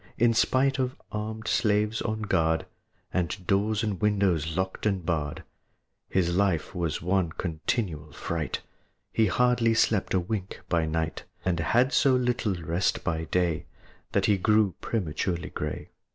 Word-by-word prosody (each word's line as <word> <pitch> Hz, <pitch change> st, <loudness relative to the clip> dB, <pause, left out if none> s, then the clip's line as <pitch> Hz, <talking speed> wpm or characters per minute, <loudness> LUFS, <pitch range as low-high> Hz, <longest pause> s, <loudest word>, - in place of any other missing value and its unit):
In 115 Hz, 0 st, +4 dB
spite 135 Hz, +4 st, +2 dB
of 130 Hz, -1 st, -1 dB, 0.2 s
armèd 110 Hz, +1 st, -4 dB
slaves 105 Hz, -1 st, +2 dB
on 110 Hz, -1 st, -2 dB
guard, 80 Hz, -5 st, +1 dB, 0.5 s
And 90 Hz, +1 st, -1 dB
doors 105 Hz, +4 st, +1 dB
and 105 Hz, -5 st, -2 dB
windows 95 Hz, -6 st, +1 dB
locked 95 Hz, +3 st, -1 dB
and 95 Hz, -4 st, -1 dB
barred, 75 Hz, -4 st, -2 dB, 0.7 s
His 85 Hz, -2 st, +1 dB
life 95 Hz, -5 st, +1 dB
was 85 Hz, -4 st, -2 dB
one 90 Hz, -2 st, +1 dB
continual 80 Hz, -2 st, -2 dB
fright; 80 Hz, +2 st, -3 dB, 0.5 s
He 110 Hz, -, +3 dB
hardly 115 Hz, +2 st, +3 dB
slept 105 Hz, -4 st, +2 dB
a -, -, +4 dB
wink 95 Hz, +1 st, -4 dB
by 85 Hz, -2 st, +2 dB
night, 80 Hz, 0 st, -2 dB, 0.2 s
And 90 Hz, -3 st, +1 dB
had 120 Hz, -, +3 dB
so 135 Hz, -2 st, +5 dB
little 120 Hz, -5 st, +1 dB
rest 85 Hz, +4 st, 0 dB
by 80 Hz, -3 st, -1 dB
day 85 Hz, -1 st, 0 dB, 0.5 s
That -, -, +3 dB
he 105 Hz, -, +4 dB
grew 105 Hz, -1 st, +3 dB
prematurely 85 Hz, -4 st, -2 dB
gray. -, -, -4 dB
95 Hz, 145 wpm, -27 LUFS, 85-110 Hz, 0.7 s, so